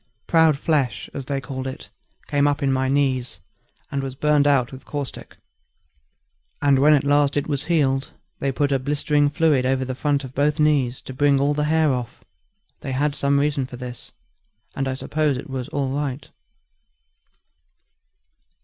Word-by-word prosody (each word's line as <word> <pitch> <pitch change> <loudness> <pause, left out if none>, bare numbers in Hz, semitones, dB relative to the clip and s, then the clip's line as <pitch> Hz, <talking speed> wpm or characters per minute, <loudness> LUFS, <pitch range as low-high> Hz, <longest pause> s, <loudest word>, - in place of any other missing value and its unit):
Proud 160 -3 +4
flesh, 135 -9 -1
as 135 -2 -6
they 140 -1 -1
called 130 0 -5
it, 130 - -8 0.3
came 145 0 +2
up 145 +1 0
in 135 -1 +2
my 130 0 0
knees, 130 -7 0 0.5
and 140 - -1
was 135 -1 -5
burned 150 0 +3
out 135 -4 +2
with 130 0 -10
caustic; 145 -3 -6 1.2
and 140 -2 +3
when 150 +2 +6
at 140 - +1
last 145 0 +2
it 145 - 0
was 145 -2 -2
healed, 140 -5 +1 0.3
they 135 - 0
put 145 +2 0
a 135 - +2
blistering 145 +1 +1
fluid 150 -3 +2
over 130 0 0
the 130 - -3
front 140 +2 0
of 130 -1 -9
both 145 +3 +1
knees 140 -5 +2
to 130 - -8
bring 140 +1 +3
all 140 +1 +2
the 150 0 0
hair 155 -2 +2
off; 125 -1 -5 0.6
they 135 - -5
had 145 +2 0
some 140 0 +1
reason 140 -2 0
for 125 - -9
this, 125 -2 -8 0.6
and 135 - -1
I 130 - -2
suppose 150 0 -1
it 135 +2 -8
was 130 -2 -4
all 140 -2 -1
right. 140 -1 -3
140 Hz, 175 wpm, -22 LUFS, 130-145 Hz, 1.2 s, when